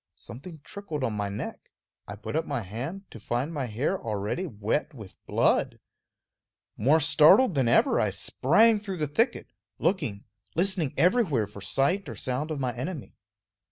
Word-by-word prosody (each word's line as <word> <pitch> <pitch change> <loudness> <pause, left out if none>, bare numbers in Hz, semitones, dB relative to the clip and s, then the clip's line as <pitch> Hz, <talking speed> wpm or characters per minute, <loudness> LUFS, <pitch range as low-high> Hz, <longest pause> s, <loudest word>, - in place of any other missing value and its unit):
Something 155 +5 -11
trickled 165 -9 -6
on 115 -4 0
my 105 -1 -2
neck; 100 - -7 0.4
I 100 - -6
put 105 +8 -6
up 160 +1 0
my 140 -4 -2
hand, 125 - -6
to 115 - -10
find 120 +8 -2
my 140 -5 -2
hair 130 - -1
already 110 - -3
wet 135 +6 -2
with 110 -6 -12
blood. - - +2 1.0
More 140 +9 +3
startled 160 - +6
than 135 -5 +1
ever, 115 - +4
I - - +2
sprang 215 - +3
through 195 -3 -6
the 155 - 0
thicket, 225 - 0 0.3
looking, 110 - -1 0.3
listening 175 -4 0
everywhere 180 - +3
for 100 0 -12
sight 140 - 0
or 115 - -6
sound 130 +8 -3
of 155 -3 -3
my 125 -3 -2
enemy. 140 +4 -5
140 Hz, 160 wpm, -27 LUFS, 115-175 Hz, 1.0 s, startled